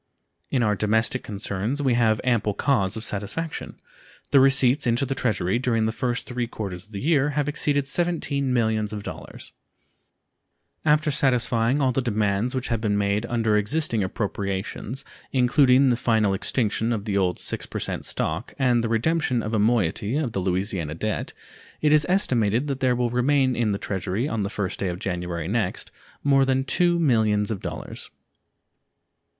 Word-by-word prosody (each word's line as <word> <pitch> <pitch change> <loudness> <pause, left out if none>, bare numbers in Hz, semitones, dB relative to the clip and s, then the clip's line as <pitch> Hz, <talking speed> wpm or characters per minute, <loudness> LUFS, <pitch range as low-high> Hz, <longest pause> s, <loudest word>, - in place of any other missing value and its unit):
In 125 -3 +1
our 105 -2 +2
domestic 110 +5 +1
concerns 105 +5 -3
we 135 -4 +2
have 110 -2 +2
ample 115 -5 +1
cause 110 -5 +1
of 110 - -5
satisfaction. 110 +12 -4 0.6
The 140 - +6
receipts 135 0 +4
into 120 +3 +2
the 135 - -2
Treasury 110 -6 0
during 115 -3 +1
the 110 - 0
three 110 - -16 0.2
first 125 - -6 0.2
quarters 95 -4 -6
of - - -25
the 100 - -5
year 145 -1 +2
have 145 -1 +1
exceeded 145 -1 +1
$17 165 -2 0
millions. 110 -4 0 1.9
After 150 0 +3
satisfying 125 -1 +2
all 130 -2 +3
the 135 - 0
demands 110 0 0
which 130 0 -2
have 115 -2 -1
been 105 -2 0
made 100 +2 0
under 115 -3 +1
existing 115 +2 +1
appropriations, 100 +5 -4 0.3
including 130 +1 +4
the - - +2
final 110 -4 +1
extinction 110 +3 0
of 110 -3 -2
the 105 -3 -2
old 90 -3 +1
6% - - -3
stock 80 +9 -2
and 125 -4 +2
the 115 - -1
redemption 125 +1 +1
of 110 - -4
a 110 - +2
moiety 110 - +1
of 145 -6 -1
the 100 - -2
Louisiana 90 -4 -2
debt, 105 +5 -3 0.5
it 150 - +2
is 150 0 +4
estimated 125 - +2
that 140 -2 -3
there 130 -2 +2
will 120 -1 0
remain 130 +1 +2
in 115 -3 +1
the 100 - -1
Treasury 100 +4 -2
on 115 -6 -2
the 100 - -2
1st 100 -3 -3
day 95 - -2
of 90 -1 -3
January 90 -3 -3
next 105 -2 -2 0.3
more 140 -1 +4
than 135 0 +1
$2 175 +5 +2
millions. 110 -8 +2
115 Hz, 160 wpm, -24 LUFS, 105-135 Hz, 1.9 s, The